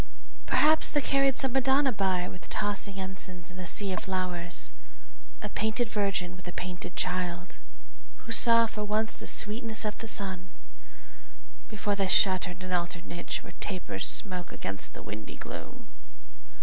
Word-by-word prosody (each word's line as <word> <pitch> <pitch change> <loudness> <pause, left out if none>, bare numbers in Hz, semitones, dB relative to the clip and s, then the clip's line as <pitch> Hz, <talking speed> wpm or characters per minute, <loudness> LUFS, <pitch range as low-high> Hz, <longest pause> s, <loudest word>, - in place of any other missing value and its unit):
Perhaps 310 +1 +5
they 295 - +2
carried 275 -1 +3
some 265 -1 +1
Madonna 270 +1 +4
by 190 -4 +1
With 180 - -10
tossing 205 -1 -1
ensigns 185 -2 -5
in 180 - -10
a 180 - -4
sea 195 +2 +4
of - - -1
flowers, 180 -2 -1 0.7
A - - -2
painted 220 +2 0
Virgin 195 -4 0
with 180 0 -12
a - - -3
painted 180 0 -5
Child, 180 0 -1 0.7
Who - - -5
saw 230 0 +6
for 215 -1 -4
once 215 +2 +1
the - - -8
sweetness 220 +1 +1
of 210 - -2
the 225 - -2
sun 190 -5 -1 1.2
Before 210 -1 -1
they 195 -1 +1
shut 185 0 +5
her 180 - -4
in 180 +1 -9
an 185 - -5
altar 175 -1 0
niche 175 - -4
Where - - -10
tapers 140 - -2
smoke 180 -4 -3
against 100 0 -4
the - - -8
windy 105 0 -7
gloom. - - -8
190 Hz, 160 wpm, -30 LUFS, 180-220 Hz, 1.2 s, saw